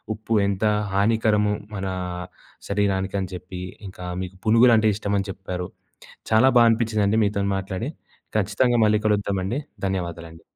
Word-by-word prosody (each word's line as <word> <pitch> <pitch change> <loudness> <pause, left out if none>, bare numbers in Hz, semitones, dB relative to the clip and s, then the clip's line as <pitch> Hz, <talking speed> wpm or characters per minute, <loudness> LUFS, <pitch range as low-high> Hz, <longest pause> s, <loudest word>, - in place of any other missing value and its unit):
ఉప్పు 110 +1 -4
ఎంత 100 +1 -2 0.3
హానికరము 105 0 +2 0.2
మన 95 -1 -4 0.8
శరీరానికి 100 -1 0
అని 95 - -4
చెప్పి, 90 +1 -8 0.3
ఇంకా 90 -1 -10 0.2
మీకు 95 +1 -8
పునుగులంటే 115 0 +5
ఇష్టమని 100 -2 -1
చెప్పారు. 90 -2 -5 0.6
చాలా 110 +4 +6
బాగా 120 -1 +7
అనిపించిందండి 110 -2 +1
మీతోని 100 -1 0
మాట్లాడి. 95 +7 -4 0.5
ఖచ్చితంగా 110 +4 +2
మళ్ళీ 105 0 +4
కలుద్దామండి. 100 +1 0 0.3
ధన్యవాదాలండి. 85 -3 -4
100 Hz, 120 wpm, -23 LUFS, 95-110 Hz, 0.8 s, బాగా